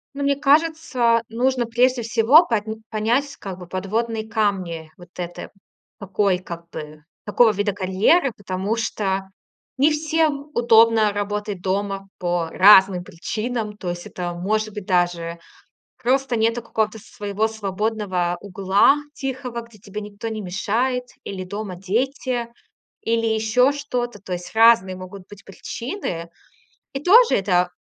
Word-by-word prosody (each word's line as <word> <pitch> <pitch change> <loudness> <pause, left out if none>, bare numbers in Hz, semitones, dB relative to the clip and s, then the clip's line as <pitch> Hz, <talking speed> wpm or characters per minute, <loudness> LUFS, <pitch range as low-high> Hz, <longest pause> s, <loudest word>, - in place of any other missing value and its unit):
Ну, 280 - -3
мне 280 0 +2
кажется, 285 -5 +2
нужно 250 +2 0
прежде 245 +2 +2
всего 235 +8 +5
по 225 -3 0 0.3
понять, 240 +6 0
как 190 -2 -7
бы, 180 - -10
подводные 220 +4 -2
камни 185 -8 -2
вот 175 -1 -14
это, 175 -1 -6 0.5
такой 200 -1 0
как 170 -2 -9
бы, 150 0 -9 0.2
такого 220 +2 +4
вида 205 0 -1
карьеры, 205 - +2
потому 190 +2 -3
что 195 -4 -2 0.5
не 285 +4 +4
всем 305 -1 0
удобно 225 -2 +5
работать 205 -1 -3
дома 195 +1 -2
по 175 -2 -1
разным 190 -1 +6
причинам. 215 +5 -4
То 185 - -5
есть 175 0 -7
это, 175 -1 -5
может 215 +4 -1
быть, 210 -3 -7
даже 175 -2 0 0.7
просто 260 0 +1
нету 230 +2 +1
какого-то 220 -1 -2
своего 210 0 -3
свободного 200 -4 -2
угла 200 +7 +3 0.2
тихого, 260 -4 -5
где 230 -2 -16
тебе 205 +1 -7
никто 205 +2 -7
не 220 -1 -4
мешает, 230 +7 -1 0.2
или 185 -2 -6
дома 200 -1 -6
дети, 240 +5 -1 0.5
или 230 0 0
ещё 220 +4 +3
что-то. 250 -6 -4
То 185 -2 -6
есть 175 0 -6
разные 220 -5 +5
могут 185 +1 -10
быть 205 -1 -14
причины. 195 - -5 0.6
И 270 - -3
тоже 455 +9 +6
это 180 -2 +2
215 Hz, 135 wpm, -22 LUFS, 190-240 Hz, 0.7 s, разным